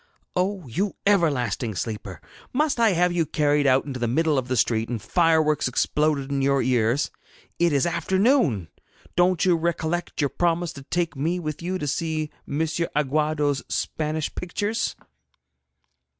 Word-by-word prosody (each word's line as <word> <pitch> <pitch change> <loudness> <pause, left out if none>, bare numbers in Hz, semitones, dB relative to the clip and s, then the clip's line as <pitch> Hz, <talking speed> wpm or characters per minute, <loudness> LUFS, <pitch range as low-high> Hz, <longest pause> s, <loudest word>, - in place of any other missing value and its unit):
'Oh, 185 -1 -1
you 190 - -2
everlasting 130 - +1
sleeper! 100 -5 -5 0.3
Must 295 -1 +1
I 225 -4 +4
have 180 +1 +2
you 175 -1 +1
carried 145 -1 +2
out 130 0 +3
into 135 -3 -5
the 120 - 0
middle 155 +5 +2
of 130 -2 -1
the 130 0 -1
street, 115 -1 +1
and 120 -2 -2
fireworks 160 - +2
exploded 140 +2 0
in 140 -1 0
your 140 0 +2
ears? 125 +2 +1 0.5
It 170 0 +3
is 140 0 +2
afternoon. 190 - +2 0.5
Don't 180 0 +3
you 180 -2 +4
recollect 170 +1 -2
your 145 -3 +1
promise 175 -1 0
to 140 - -10
take 170 +4 -2
me 165 +6 -1
with 155 -2 -5
you 185 +2 -2
to 150 - -4
see 155 +1 -2 0.2
M. 145 +3 -2
Aguado's 150 -2 0
Spanish 155 0 -2
pictures?' 205 +5 -2
155 Hz, 150 wpm, -24 LUFS, 135-175 Hz, 0.5 s, I